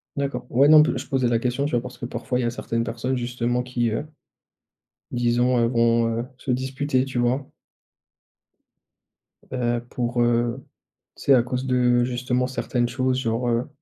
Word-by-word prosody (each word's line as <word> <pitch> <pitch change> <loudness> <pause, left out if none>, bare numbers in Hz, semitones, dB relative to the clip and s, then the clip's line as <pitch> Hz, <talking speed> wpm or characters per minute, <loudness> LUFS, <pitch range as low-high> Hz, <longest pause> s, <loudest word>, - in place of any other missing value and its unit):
D'accord, 135 -3 -3
ouais 135 +4 +5
non 155 0 +8
pl - - 0
je - - -8
posais 135 -3 +1
la 115 -1 +2
question 125 +3 -1
tu 145 - -2
vois 120 - +1
parce 125 +1 -9
que - - -6
parfois 120 +1 -3
il 125 - 0
y - - 0
a 120 - 0
certaines 115 -1 -2
personnes 120 +3 -2
justement 120 0 -1
qui, 120 -2 -1
heu, 110 +7 -2 1.1
disons, 120 +1 +2
heu, 115 - +3
vont, 115 -1 +2
heu, 120 - -3
se 130 - -6
disputer 130 +1 0
tu 130 -2 -4
vois? 125 +3 0 2.0
Heu, 120 -2 -1
pour, 120 0 -1
heu, 120 +2 +1 0.5
tu - - -12
sais 140 - +5
à 125 -3 +5
cause 125 +1 -3
de 125 -1 +3
justement 125 0 -1
certaines 125 -2 -1
choses 130 +1 0
genre, 115 0 -1
heu: 120 +2 0
125 Hz, 180 wpm, -23 LUFS, 120-130 Hz, 2.0 s, non